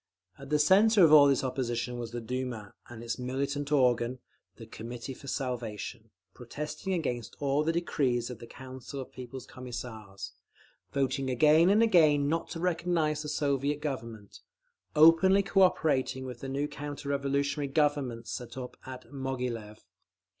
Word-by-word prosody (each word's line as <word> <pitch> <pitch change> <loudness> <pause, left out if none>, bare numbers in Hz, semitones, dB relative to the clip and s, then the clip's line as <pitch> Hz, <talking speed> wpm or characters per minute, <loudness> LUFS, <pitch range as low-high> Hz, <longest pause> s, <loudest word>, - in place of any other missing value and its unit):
At 135 0 -10
the 150 - +3
centre 195 +7 +5
of 155 -2 +6
all 145 -2 +9
this 135 -2 +2
opposition 125 -2 -2
was 120 -1 -4
the 120 +1 -5
Duma, 120 -3 -5 0.2
and 120 -1 -9
its 115 +1 -4
militant 140 +3 -2
organ, 125 -3 +2 0.4
the 115 - -11
Committee 120 +3 -7
for 140 - -13
Salvation, 120 -4 -4 0.2
protesting 150 +9 -5
against 120 -9 -3
all 140 +1 +1
the 160 - +1
decrees 130 -8 0
of 125 - -9
the 120 - -10
Council 130 +2 -9
of 130 - -7
People's 130 0 -8
Commissars, 110 -7 -8 0.6
voting 135 -1 0
again 155 +7 +5
and 210 +3 +5
again 155 -9 +4
not 165 +3 -1
to 165 - -5
recognise 165 -3 0
the 150 - -5
Soviet 145 0 0
Government, 115 -8 -6 0.6
openly 165 +6 +6
cooperating 145 -10 +2
with 125 -2 -7
the 135 - -6
new 140 +2 -1
counter 145 -1 -7
revolutionary 140 +1 0
"Governments" 135 -5 0
set 125 +1 -6
up 125 -1 -7
at 130 -1 -8
Moghilev…. 125 -6 -4
135 Hz, 150 wpm, -29 LUFS, 120-150 Hz, 0.6 s, all